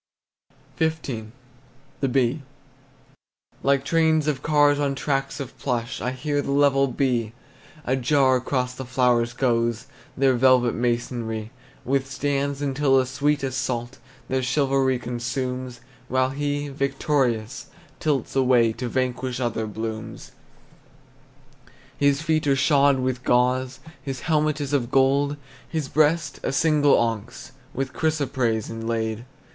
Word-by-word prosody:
XV. 140 -9 -2 0.7
THE 135 - +1
BEE. 130 +2 +1 1.2
Like 140 0 +2
trains 160 -1 +2
of 140 -3 -1
cars 145 -2 +3
on 140 -1 0
tracks 135 -1 -2
of 135 -2 -6
plush 120 -3 -2
I 125 - -1
hear 145 +3 -2
the 140 - -6
level 140 -1 +3
bee: 120 -4 -1 0.5
A 130 - +1
jar 130 0 +3
across 125 0 -2
the 130 - -7
flowers 125 -2 +1
goes, 120 -2 0 0.3
Their 135 0 +4
velvet 125 -1 +4
masonry 120 -2 -2 0.3
Withstands 140 +1 -1
until 135 -1 +2
the 130 - +3
sweet 140 +2 0
assault 125 -1 -3 0.3
Their 130 0 0
chivalry 135 0 +1
consumes, 125 +1 -4 0.3
While 130 0 +1
he, 145 +1 -2
victorious, 135 -5 -1 0.3
tilts 140 -6 -1
away 125 -4 +4
To 125 +1 -4
vanquish 130 0 -2
other 115 -3 -2
blooms. 110 +1 -6 1.6
His 140 +1 +2
feet 155 -2 +1
are 140 - +4
shod 140 0 +4
with 130 0 -2
gauze, 125 +1 +1 0.2
His 135 -3 -5
helmet 155 -1 +1
is 145 -1 -4
of 125 -4 +1
gold; 140 +2 +2 0.3
His 155 -4 -2
breast, 155 0 +1
a - - -2
single 145 0 +3
onyx 115 +3 -3 0.2
With 135 -1 -3
chrysoprase, 130 -8 0
inlaid. 115 0 -3
130 Hz, 125 wpm, -24 LUFS, 120-140 Hz, 1.6 s, Their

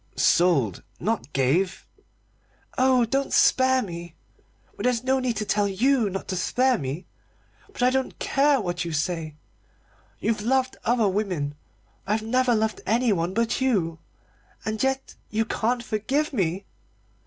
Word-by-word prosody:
"Sold 140 - +3 0.2
not 220 -9 -2
gave 150 +9 0 0.4
" - - -39 0.2
"Oh, 255 -2 +4
don't 270 +4 -1
spare 260 0 +4
me! 170 -2 -8 0.6
But - - -5
there's 250 -1 +1
no 265 +1 +2
need 250 -2 -1
to 215 - -2
tell 205 0 +1
you 230 +3 +2
not 195 0 -5
to 185 - -1
spare 250 +7 +1
me. 140 +5 -4 0.7
But - - -3
I 250 - +5
don't 265 0 -1
care 280 0 +2
what 175 -4 -2
you 170 -1 -4
say. 155 -1 -2 0.8
You've 225 -2 -1
loved 260 +3 +1
other 235 -2 +2
women. 185 -8 -1 0.5
I've 215 +2 0
never 250 +1 +2
loved 220 0 -1
anyone 205 -6 +1
but 230 +2 0
you. 180 -11 +1 0.7
And 215 0 -2
yet 265 0 -1 0.2
you 220 +1 0
can't 235 +2 -1
forgive 265 +9 -1
me!" 190 -3 -1
220 Hz, 145 wpm, -25 LUFS, 180-255 Hz, 0.8 s, I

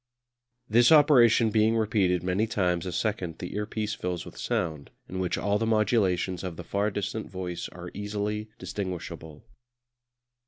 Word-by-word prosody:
This 120 +5 +5
operation 125 -7 +6
being 110 +1 +3
repeated 100 -5 +1
many 95 +5 +1
times 90 -4 0
a - - -3
second 90 -3 -2
the 90 - -6
earpiece 105 0 -2
fills 90 -4 -4
with - - -11
sound, 80 -5 -2 0.2
in 95 - -5
which 90 -2 -1
all 105 0 0
the 115 - 0
modulations 100 -5 +1
of 90 -3 -5
the 90 - -6
far 100 +5 0
distant 105 +2 -4
voice 90 -2 -5
are 90 0 -9
easily 105 +1 -3
distinguishable. 90 -7 -6
100 Hz, 150 wpm, -27 LUFS, 90-110 Hz, 0.2 s, operation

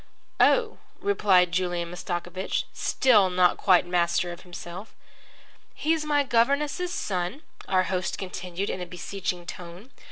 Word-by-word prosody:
"Oh," 455 -3 +3 0.2
replied 195 - +3
Julian 175 -1 -1
Mastakovich, 175 +1 -3
still 215 -8 +3
not 180 -1 +3
quite 180 -2 +4
master 175 0 +1
of 170 - -9
himself. 180 +2 -9 0.8
"He's 315 0 0
my 290 -1 +2
governess's 280 +8 +1
son," 185 - -3 0.2
our 185 -1 +3
host 185 -1 -2
continued 185 0 -4
in 185 - -5
a 180 - -5
beseeching 180 0 -4
tone. 180 +7 -9
185 Hz, 125 wpm, -26 LUFS, 175-235 Hz, 0.8 s, quite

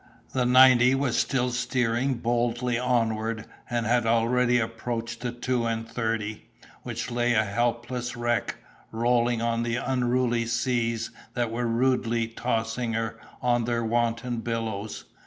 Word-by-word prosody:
The 125 -2 +1
ninety 130 0 +7
was 135 -3 0
still 125 -1 +1
steering 125 +1 0
boldly 120 +1 0
onward, 115 -3 0 0.2
and 120 -1 -1
had 120 0 +2
already 120 +2 +3
approached 115 0 -4
the 120 -1 -2
two 120 0 -1
and 115 0 -2
thirty, 110 -2 -3 0.3
which - - -5
lay 120 0 +1
a 110 0 +3
helpless 120 +3 -2
wreck, 120 -3 0 0.4
rolling 120 0 +1
on 115 0 0
the 115 0 -1
unruly 125 -2 0
seas 115 -1 0 0.2
that 120 -2 0
were 120 +1 -1
rudely 115 -1 +1
tossing 115 0 -2
her 115 0 -2 0.2
on 120 -1 +2
their 115 -1 -1
wanton 120 +1 0
billows. 115 -2 -4
120 Hz, 135 wpm, -26 LUFS, 115-125 Hz, 0.4 s, ninety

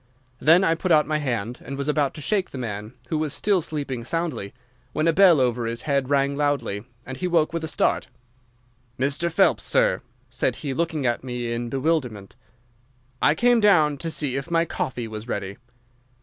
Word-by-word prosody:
Then 170 +5 +5
I 165 - +3
put 175 +2 -2
out 150 -2 +5
my 155 0 -1
hand 120 -4 -3
and 135 - -6
was 140 0 -2
about 150 -2 +1
to 155 - -8
shake 195 +4 0
the - - -8
man, 110 -1 -5
who 155 - 0
was 155 -2 -2
still 200 -3 +2
sleeping 140 -6 -4
soundly, 165 -8 -3 0.4
when 155 +2 +1
a 165 - +4
bell 180 -4 +6
over 120 -2 +1
his 115 +1 -4
head 140 -3 0
rang 140 0 +2
loudly, 140 -8 -1 0.2
and 130 0 -7
he 180 - -2
woke 170 -2 +2
with 165 -1 -2
a - - -2
start. 155 - 0 0.9
"'Mr. 145 +6 0
Phelps, 190 +4 +3
sir!' - - +2 0.3
said - - -1
he, 135 - -1
looking 160 -1 -1
at 120 0 0
me 125 -2 -3
in 120 0 -3
bewilderment. 130 -7 -1 0.9
"'I 150 - +4
came 240 +4 +4
down 165 -9 +4
to 165 - -3
see 145 -5 -2
if 135 +4 -5
my 165 0 +2
coffee 125 -6 -3
was 110 +1 -7
ready. 100 -3 -4
145 Hz, 190 wpm, -24 LUFS, 125-165 Hz, 0.9 s, bell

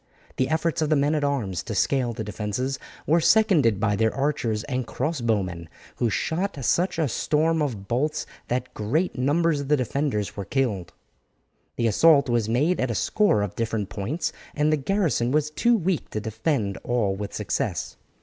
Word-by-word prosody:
The 130 - +1
efforts 160 +1 0
of 155 - +1
the 155 - +4
men 145 +2 +2
at 150 -2 0
arms 115 -12 -1
to 110 - -5
scale 125 +3 +1
the 110 - -5
defences 105 +6 -3 0.3
were 165 +3 +3
seconded 155 - +4
by 105 -1 +1
their 110 +1 +2
archers 135 -6 -1
and 130 -4 -3
crossbow 120 - 0
men, 85 -3 -7 0.3
who 120 - +1
shot 175 - -1
such 180 0 +1
a 160 -3 +2
storm 155 +6 +1
of 110 -10 -3
bolts 150 +7 0 0.2
that 125 +1 -2
great 145 - -1
numbers 150 +4 +2
of 140 - -6
the 150 +1 +3
defenders 130 -4 -1
were 100 - -4
killed. 105 -7 -1 0.8
The 115 - 0
assault 140 +5 +5
was 115 -2 +1
made 150 +10 +2
at 130 - 0
a 115 - -1
score 205 - +2
of 100 - -4
different 110 -3 -2
points, 120 - -3 0.2
and 150 +1 +2
the - - +3
garrison 155 - 0
was 150 +1 +1
too 235 +8 +3
weak 180 -3 -1
to 105 - -3
defend 110 -1 -1
all 115 -6 0
with 100 0 -5
success. - - -2
130 Hz, 180 wpm, -25 LUFS, 110-155 Hz, 0.8 s, assault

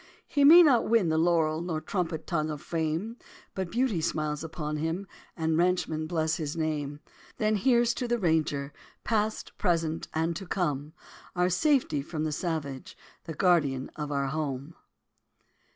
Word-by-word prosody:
He 285 - +1
may 335 +5 +10
not 260 -7 +4
win 225 -7 +3
the 160 - +1
laurel 160 -2 +2
Nor 170 -3 -2
trumpet 160 -1 -3
tongue 155 -3 -1
of 150 -1 -4
fame; 165 - -2 0.4
But 190 -2 -3
beauty 230 -5 0
smiles 155 -1 -2
upon 155 -2 -4
him, 165 +5 -2 0.3
And 160 -1 +1
ranchmen 170 -3 +1
bless 160 -1 0
his 155 0 -4
name. 150 -2 -2 0.4
Then 215 0 +1
here's 240 +2 +3
to 245 - -3
the 240 - +1
Texas 230 - -6
Ranger, 150 -4 0 0.3
Past, 215 -1 -1
present 165 -3 0
and 165 +1 -1
to 195 - -8
come! 150 -5 -2 0.4
Our 180 +1 +2
safety 245 - +2
from 155 +2 -4
the 155 - -1
savage, 150 -5 -4 0.3
The 160 - -6
guardian 145 -7 +2
of 150 -1 -4
our 140 -1 0
home. 145 0 -3
160 Hz, 160 wpm, -28 LUFS, 155-185 Hz, 0.4 s, may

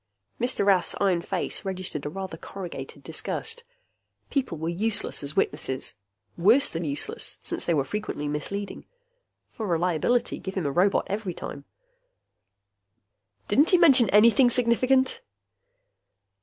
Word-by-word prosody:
Mr. 245 -4 0
Rath's 195 -3 +3
iron 190 -4 +2
face 185 +3 -3
registered 185 -7 -3
a - - -3
rather 190 +1 -6
corrugated 180 +1 -8
disgust. 465 +1 -3 0.7
People 265 - -1
were 160 +2 -4
useless 210 +5 0
as 145 +1 -5
witnesses. 135 -3 -1 0.5
Worse 225 +11 +5
than 165 +1 -4
useless, 145 -2 -1
since - - -3
they 170 - +1
were 140 - +2
frequently 210 -4 -4
misleading. 195 +8 -4 0.6
For 220 - -5
reliability, 180 +7 0
give 190 - -7
him 185 -5 -2
a 140 - 0
robot 185 +7 +2
every 200 -3 -4
time. 140 - -7 1.8
"Didn't 285 +10 +4
he 365 - +6
mention 270 - +6
anything 235 +4 +6
significant?" 255 +2 +2
195 Hz, 130 wpm, -26 LUFS, 170-235 Hz, 1.8 s, he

